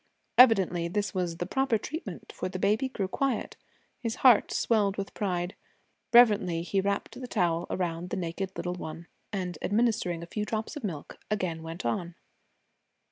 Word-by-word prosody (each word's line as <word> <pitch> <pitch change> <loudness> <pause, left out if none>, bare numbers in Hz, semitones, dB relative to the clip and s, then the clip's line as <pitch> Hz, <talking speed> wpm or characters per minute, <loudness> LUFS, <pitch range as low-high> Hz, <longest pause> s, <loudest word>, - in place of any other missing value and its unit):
Evidently 190 -8 +6
this 205 +4 -1
was 175 -3 -1
the 175 - -2
proper 265 +3 +1
treatment, 225 - -7
for 185 - -3
the 185 - -4
baby 210 +7 +1
grew 200 -7 -2
quiet. 260 +3 -1 0.4
His 230 -2 -2
heart 245 -4 +7
swelled 210 -4 +2
with 195 -1 -4
pride. 180 -3 -2 0.6
Reverently 205 -8 +5
he 195 +2 0
wrapped 200 +5 -2
the 250 - -5
towel 170 -5 0
around 175 -1 -2
the - - -2
naked 185 +2 -3
little 175 +1 -2
one, 165 -1 -7 0.3
and 180 -5 -3
administering 205 -6 +1
a - - -5
few 210 +5 -3
drops 220 +5 -3
of 295 - -7
milk, 165 -8 -5
again 185 -6 -1
went 165 -1 -7
on. 170 +9 -2
190 Hz, 165 wpm, -29 LUFS, 175-215 Hz, 0.6 s, heart